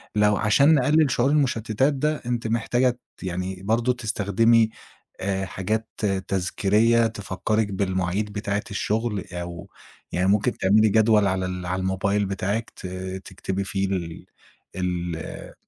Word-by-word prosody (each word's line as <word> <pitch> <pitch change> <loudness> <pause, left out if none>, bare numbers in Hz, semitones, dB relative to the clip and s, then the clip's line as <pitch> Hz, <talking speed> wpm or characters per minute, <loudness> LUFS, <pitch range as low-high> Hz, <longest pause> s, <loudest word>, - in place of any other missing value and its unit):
لو 105 -1 +4
عشان 140 +8 +4
نقلِّل 150 +1 +3
شعور 125 +1 +2
المُشتّتات 130 -2 +1
ده، 150 +2 -1
أنتِ 120 -1 -2
محتاجة 120 +3 +2 0.3
ت - - -13
يعني 90 +1 -4
برضه 115 +4 +2
تستخدمي 115 0 +2 0.5
آآ 95 0 -1
حاجات 110 +4 -2 0.4
تذكيريّة 105 +5 +2
تفكّرِك 105 +1 -1
بالمواعيد 95 +1 -1
بتاعة 100 -1 -2
الشُغل 105 -1 -1
أو 85 +1 -6 0.4
يعني 90 +1 +1
ممكن 105 +5 +2
تعملي 105 +3 +4
جدول 110 -1 +4
على 95 -1 0
ال 90 -1 -5
على 90 +1 -1
الموبايل 100 +2 0
بتاعِك 100 +4 -2
ت 90 - -6 0.4
تكتبي 95 +1 -4
فيه 95 0 -1
ال 85 -4 -4 0.5
ال 90 -3 -4
105 Hz, 130 wpm, -24 LUFS, 95-115 Hz, 0.5 s, لو